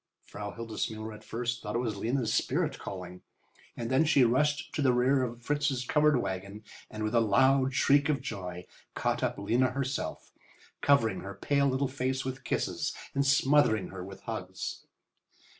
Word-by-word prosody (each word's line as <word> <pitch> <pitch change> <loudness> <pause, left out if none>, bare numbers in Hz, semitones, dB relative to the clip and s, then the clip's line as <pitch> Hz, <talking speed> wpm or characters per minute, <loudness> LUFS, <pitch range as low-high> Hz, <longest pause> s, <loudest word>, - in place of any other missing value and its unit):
Frau 100 0 -6
Hildesmuller 110 -1 -4
at 105 - -12
first 120 +1 -3
thought 105 - -4
it - - +3
was 115 -3 -1
Lena's 115 +4 -1
spirit - - 0
calling, 90 -1 -7 0.6
and 115 +1 -3
then 130 +4 +4
she 150 -4 +4
rushed 145 +6 +1
to 150 - -1
the 130 -3 +4
rear 130 +2 +3
of 120 -1 -4
Fritz's 145 -2 0
covered 150 +1 +3
wagon, 100 +1 -5 0.3
and, 110 0 -5
with 110 +1 -1
a 120 - +5
loud 130 +4 +3
shriek 140 +1 +4
of 145 -2 +2
joy, 90 -4 -6 0.3
caught - - 0
up - - -1
Lena 120 +6 +2
herself, 135 +1 -3 0.5
covering 140 -6 +3
her 100 0 -7
pale 140 -1 +1
little 135 +1 +1
face 130 0 -2
with 130 0 -5
kisses - - -1 0.2
and 140 0 +1
smothering 140 - +3
her 95 -2 -7
with 95 +1 -10
hugs. - - -6
125 Hz, 170 wpm, -30 LUFS, 110-140 Hz, 0.6 s, a